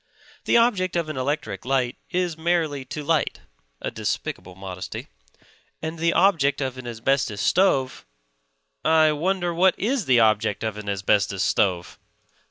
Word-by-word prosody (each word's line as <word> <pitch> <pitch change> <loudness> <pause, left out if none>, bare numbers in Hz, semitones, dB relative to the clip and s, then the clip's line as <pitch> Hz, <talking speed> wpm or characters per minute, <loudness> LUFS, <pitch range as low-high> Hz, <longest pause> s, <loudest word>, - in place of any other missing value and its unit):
The - - +4
object 200 -7 +2
of 170 -2 -1
an 155 - -5
electric 130 -7 -2
light 130 -1 0
is 180 -2 -1
merely 160 -4 0
to 150 - -6
light 160 0 0 0.4
(a - - -4
despicable 90 - -4
modesty); 95 -1 -7 0.7
and 160 +1 -5
the 170 +1 +2
object 145 -8 +3
of 130 -2 -2
an 125 - -8
asbestos 120 -2 -1
stove... 135 - +1 0.8
I 155 +1 +5
wonder 175 +3 -1
what 185 +2 +3
is 240 +1 -1
the 125 -2 +5
object 110 -1 +2
of 110 -1 -3
an 105 -1 -6
asbestos 100 0 +1
stove? 90 -4 0
145 Hz, 145 wpm, -24 LUFS, 110-170 Hz, 0.8 s, I